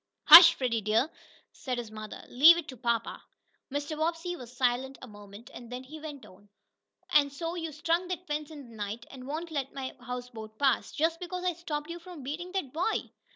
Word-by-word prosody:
"Hush, 335 -1 +11
Freddie 235 -4 -1
dear," 220 +9 +1 0.4
said 255 -2 -5
his 235 -3 -6
mother. 215 -1 -8
"Leave 315 +7 +7
it 340 - -5
to 260 - -8
papa." 230 -1 -2 0.5
Mr. 290 +2 -3
Bobbsey 330 +3 -2
was 245 -7 -11
silent 255 +1 -1
a 255 - -10
moment, 205 +1 -13
and 240 0 -11
then 250 +1 -6
he 305 +4 -10
went 295 -3 -9
on: 200 +2 -18 0.6
"And 285 -1 +4
so 330 +4 -4
you 330 -2 -4
strung 335 +4 -1
that 365 0 -5
fence 300 -1 -4
in 290 -5 -11
the - - -13
night, 215 +2 -5
and 255 -1 -10
won't 320 +4 -5
let 275 -3 -4
my 265 -1 -5
houseboat 245 -3 -8
pass, 270 -4 +1
just 325 +2 0
because 360 0 -5
I 365 -1 +1
stopped 310 -2 -5
you 345 - -6
from 340 -4 -11
beating 330 +7 -5
that 335 -10 -3
boy?" 355 +8 -1
280 Hz, 200 wpm, -29 LUFS, 245-330 Hz, 0.6 s, Hush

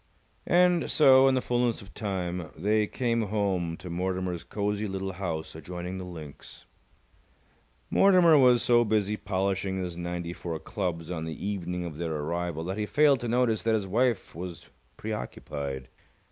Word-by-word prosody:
And 175 -1 +4
so, 135 -3 +6
in 135 - +4
the 130 - 0
fullness 120 -1 +1
of 95 - -15
time, 90 -5 -3
they 105 +5 +2
came 115 -1 0
home 95 -5 -1
to - - -10
Mortimer's 90 0 -2
cosy 105 0 -2
little 95 0 -3
house 85 -4 -4
adjoining 90 +3 -6
the 90 - -6
links. 80 -5 -10 1.3
Mortimer 180 -4 +6
was 125 -4 +5
so 120 -1 +5
busy 105 -2 +1
polishing 95 -1 -1
his 90 -2 -4
ninety 85 0 -4
four 85 -2 -5
clubs 85 -3 -4
on 80 -2 -3
the 80 +3 -6
evening 90 -3 -3
of 80 -3 -6
their 80 -1 -2
arrival 80 +2 -2
that 95 +4 -4
he 105 - -1
failed 145 0 +4
to 120 - -4
notice 115 -2 +2
that 115 0 +2
his 105 -3 -1
wife 115 +4 0
was 85 -1 -8 0.3
preoccupied. 65 +1 -5
95 Hz, 160 wpm, -28 LUFS, 85-115 Hz, 1.3 s, so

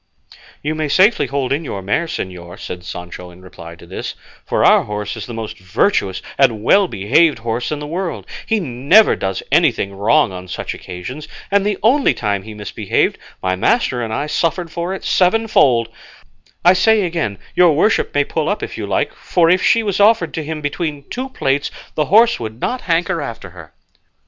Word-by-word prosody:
"You 150 +2 -1
may 155 -1 -2
safely 185 +10 +3
hold 140 -1 -1
in 150 +4 -2
your 100 -10 -5
mare, 105 - 0
señor," 90 - -6
said 90 -1 -7
Sancho 90 0 -8
in 90 +1 -16
reply 85 -2 -11
to 85 - -15
this, 95 - -6 0.3
"for - - +1
our - - +5
horse 105 +1 -4
is 110 - -7
the 120 - -7
most 110 -1 -6
virtuous 95 - 0 0.2
and 115 -6 +3
well 195 - +4
behaved 140 - +2
horse 115 +3 -3
in 150 - -1
the 150 - -6
world; 170 +3 -4 0.2
he 225 - +1
never 150 - +4
does 95 -1 -3
anything 100 0 +2
wrong 110 +6 +3
on 90 0 -8
such 90 - -5
occasions, 125 +12 -8 0.2
and 200 0 +3
the 205 -1 -1
only 265 +5 +3
time 100 -3 -1
he 110 +1 -10
misbehaved, 105 0 -1 0.2
my 95 0 +1
master 125 - +1
and 115 -2 -4
I 140 +6 -1
suffered 165 +2 -1
for 170 +2 -3
it 190 - -5
sevenfold; 180 - +3 0.8
I 180 - +8
say 215 +3 +3
again 165 - -2 0.2
your 175 -3 +5
worship 185 +9 +2
may 145 - +4
pull 155 +1 -2
up 205 - -2
if - - -6
you - - -4
like; - - -1
for 170 -2 +1
if 185 - +3
she 230 - +3
was 200 -3 -1
offered 205 -5 +4
to 160 - -3
him 155 0 -5
between 145 0 -3
two 260 +2 -4
plates 140 - -1 0.2
the 150 - 0
horse 225 +6 +4
would 110 0 -6
not 250 - -2
hanker 170 0 0
after 115 -8 -7
her." 80 -3 -13
145 Hz, 195 wpm, -18 LUFS, -, 0.8 s, I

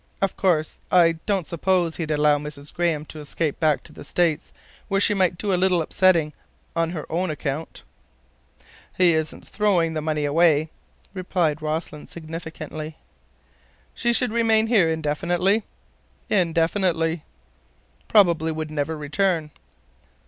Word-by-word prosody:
"Of 195 -1 0
course, 160 -5 0
I 165 -2 +4
don't 195 -5 +1
suppose 175 0 0
he'd 160 -3 -3
allow 150 -1 +3
Mrs. 150 0 -8
Graham 165 -3 0
to 155 - -9
escape 150 +1 -3
back 150 -5 +2
to - - -11
the - - -10
States—where 175 +4 -2
she 210 - +3
might 185 -3 +1
do 200 +1 -1
a 180 - +1
little 185 -2 +3
upsetting 165 -2 +2 0.4
on 165 -1 +1
her 165 -3 -5
own 175 +2 0
account?" 150 0 -4 1.1
"He 180 -2 +5
isn't 160 -1 -3
throwing 185 -6 +1
the 155 - -2
money 150 -1 -1
away," 155 0 +3 0.4
replied 175 -5 -1
Rossland 155 -1 -4
significantly. 160 -1 -7 1.0
"She 240 - -1
would 250 - 0
remain 225 -1 +3
here 215 -8 +3
indefinitely?" 175 +6 0 0.7
"Indefinitely." 165 -1 +1 0.8
"Probably 170 -6 +4
never 155 +1 -3
would - - -10
return." 160 +1 0
165 Hz, 130 wpm, -23 LUFS, 155-185 Hz, 1.1 s, He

